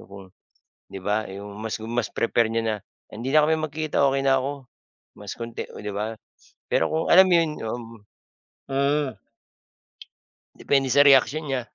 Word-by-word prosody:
O, - - -15
kung 100 -1 -11 0.7
di 95 - -7
ba, 105 +3 -1
'yong 100 +1 -9
mas 110 +1 -5
gu 110 - -7
mas 120 -1 -2
prefer 115 -1 +1
niya 115 0 0
na, 110 - 0 0.3
"Hindi 120 +6 -5
na 155 -1 +6
kami 160 - +3
magkita, 155 -1 -1
okey 135 0 0
na 135 - +5
ako." 135 +2 -1 0.6
Mas 105 -1 -8
konti, 115 0 -5
oh, - - -9
'di 105 0 -5
ba? 105 +2 -3 0.5
Pero - - +1
kung 160 +1 -1
alam 190 +2 +9
mo - - +4
'yon, 165 -2 +2
oo, 115 +2 -3
mm. 115 -2 -11 0.7
Hmm. 140 +1 +1 1.5
Depende 135 -1 +1
sa 145 +3 +6
reaksyon 140 +3 +5
niya. 135 -2 -1
120 Hz, 180 wpm, -24 LUFS, 110-140 Hz, 1.5 s, alam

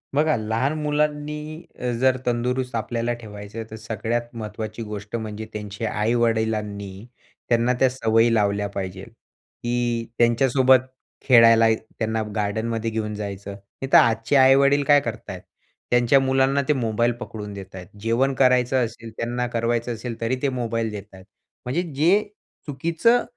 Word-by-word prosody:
बघा 155 0 +3
लहान 115 +7 -1
मुलांनी 150 0 -1 0.4
अ, 125 0 -1
जर 130 0 +3
तंदुरुस्त 125 +1 -1
आपल्याला 115 +1 -1
ठेवायचं 105 +1 -8
तर - - -6
सगळ्यात 115 +2 -3
महत्त्वाची 110 0 -6
गोष्ट 105 0 -6
म्हणजे 110 -1 -5
त्यांच्या 105 +1 -4
आई-वडिलांनी 110 -3 -1 0.4
त्यांना 120 +1 +3
त्या 130 - +4
सवयी 115 -2 +2
लावल्या 100 -1 +1
पाहिजे 95 +2 -5 0.5
की 120 -1 -1
त्यांच्यासोबत 130 +2 +4 0.5
खेळायला 115 -3 +7 0.3
त्यांना 110 0 -1
गार्डनमध्ये 110 +2 -1
घेऊन 110 -1 -3
जायचं. 100 -1 -6
नाही 100 +6 -9
तर - - +10
आजचे 115 +4 +3
आई-वडील 140 +2 +5
काय 145 0 +5
करत - - -6
आहेत? - - -6 0.5
त्यांच्या 120 +2 +4
मुलांना 135 +1 +2
ते 150 - +4
मोबाईल 120 -1 +1
पकडून 105 -4 -7
देत 95 -1 -10
आहेत. 90 -1 -9
जेवण 120 +5 +1
करायचं 125 -1 +3
असेल, 115 0 -9
त्यांना 120 +1 -2
करवायचं 120 0 -1
असेल 115 +1 -6
तरी 115 +3 0
ते 140 - +1
मोबाईल 115 -3 -2
देत 105 -2 -6
आहेत. 95 -1 -14 0.4
म्हणजे 135 +8 0
जे 175 +8 +4 0.5
चुकीचं, 170 - +2
115 Hz, 140 wpm, -23 LUFS, 110-130 Hz, 0.5 s, तर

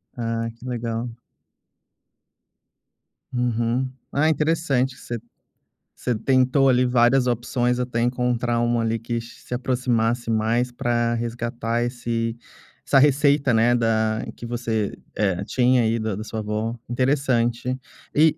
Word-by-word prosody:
Ah, 115 -1 -2
que 125 - -13
legal. 115 -1 -3 2.2
Uhum. 120 +1 0 0.2
Ah, 150 +3 +3
interessante 150 -4 +1
você 120 -1 -5 0.8
você 125 - -1
tentou, 130 +4 +3
ali, 125 -1 +4
várias 125 +1 +4
opções 125 +1 0
até 125 -2 -1
encontrar 120 -1 0
uma, 120 0 +1
ali, 115 0 0
que 115 +1 -3
che 115 0 -13
se - - -8
aproximasse 120 -2 0
mais 115 +3 +1
pra 120 -1 0
resgatar 120 0 -2
esse 120 -1 -2 0.5
essa 135 - +5
receita, 140 -1 +4
né, 115 +2 +4
da 110 -2 +1
que - - -9
você, 115 -3 -2 0.2
eh, 95 -3 0
tinha 125 +1 +3
aí 115 +1 +1
da 110 -2 -2
da 105 - -5
sua 110 0 -5
avó, 110 +2 -2
interessante 125 -1 +1 0.3
e 155 +1 +4
120 Hz, 125 wpm, -23 LUFS, 115-125 Hz, 2.2 s, essa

